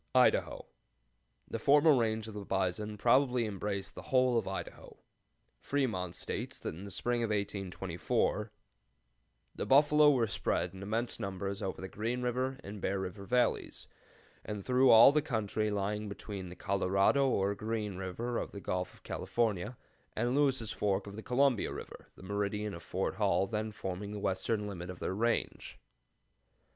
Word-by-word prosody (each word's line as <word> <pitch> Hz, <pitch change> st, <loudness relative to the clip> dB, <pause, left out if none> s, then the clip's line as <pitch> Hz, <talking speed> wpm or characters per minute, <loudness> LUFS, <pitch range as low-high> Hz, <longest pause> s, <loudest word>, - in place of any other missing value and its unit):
IDAHO. -, -, +3 dB, 0.8 s
The 115 Hz, -, -4 dB
former 145 Hz, +5 st, +6 dB
range 110 Hz, -2 st, 0 dB
of 110 Hz, -, -8 dB
the 105 Hz, -1 st, -6 dB
bison 95 Hz, +2 st, -1 dB
probably 125 Hz, +2 st, +3 dB
embraced 100 Hz, -1 st, -3 dB
the -, -, -8 dB
whole 130 Hz, -1 st, +2 dB
of 115 Hz, -, +1 dB
Idaho. 95 Hz, -, -6 dB, 0.6 s
Fremont 110 Hz, -11 st, -1 dB
states -, -, -4 dB
that -, -, -5 dB
in 90 Hz, +5 st, -9 dB
the -, -, -7 dB
spring 120 Hz, +4 st, -1 dB
of 115 Hz, -, 0 dB
1824 100 Hz, 0 st, -1 dB, 1.0 s
"the -, -, -4 dB
buffalo 150 Hz, +2 st, +6 dB
were 130 Hz, -5 st, +3 dB
spread 95 Hz, -3 st, -1 dB
in 95 Hz, -, -10 dB
immense 110 Hz, +4 st, -2 dB
numbers 100 Hz, 0 st, -4 dB
over 95 Hz, -, -3 dB
the 95 Hz, -, -5 dB
Green 115 Hz, +6 st, -3 dB
River 130 Hz, +2 st, -1 dB
and 100 Hz, 0 st, -8 dB
Bear 95 Hz, +1 st, 0 dB
River 95 Hz, +1 st, -5 dB
Valleys, 125 Hz, +3 st, 0 dB, 0.6 s
and 105 Hz, -2 st, -5 dB
through 130 Hz, +1 st, +4 dB
all 115 Hz, +4 st, +9 dB
the 150 Hz, +1 st, +2 dB
country 110 Hz, -5 st, -1 dB
lying 105 Hz, +1 st, -2 dB
between 100 Hz, -2 st, -6 dB
the 90 Hz, -, -9 dB
Colorado, 100 Hz, +8 st, +2 dB
or 100 Hz, -4 st, +1 dB
Green 105 Hz, -1 st, -3 dB
River 105 Hz, +6 st, -3 dB
of -, -, -5 dB
the 100 Hz, -, -6 dB
Gulf 90 Hz, -1 st, -3 dB
of -, -, -22 dB
California, 115 Hz, 0 st, -1 dB, 0.4 s
and 120 Hz, +3 st, 0 dB
Lewis' 130 Hz, -6 st, +2 dB
Fork 100 Hz, -1 st, 0 dB
of 100 Hz, -1 st, -8 dB
the 110 Hz, -, -6 dB
Columbia 130 Hz, -1 st, +2 dB
River, -, -, -9 dB
the -, -, -14 dB
meridian 105 Hz, +1 st, -2 dB
of -, -, -8 dB
Fort -, -, -2 dB
Hall -, -, +2 dB
then 110 Hz, +1 st, -3 dB
forming 100 Hz, +1 st, -5 dB
the 105 Hz, -, -4 dB
western 100 Hz, +3 st, -1 dB
limit 90 Hz, -3 st, -6 dB
of 90 Hz, -, -6 dB
their 95 Hz, -, -3 dB
range." 115 Hz, +3 st, -1 dB
105 Hz, 165 wpm, -32 LUFS, 95-120 Hz, 1.0 s, all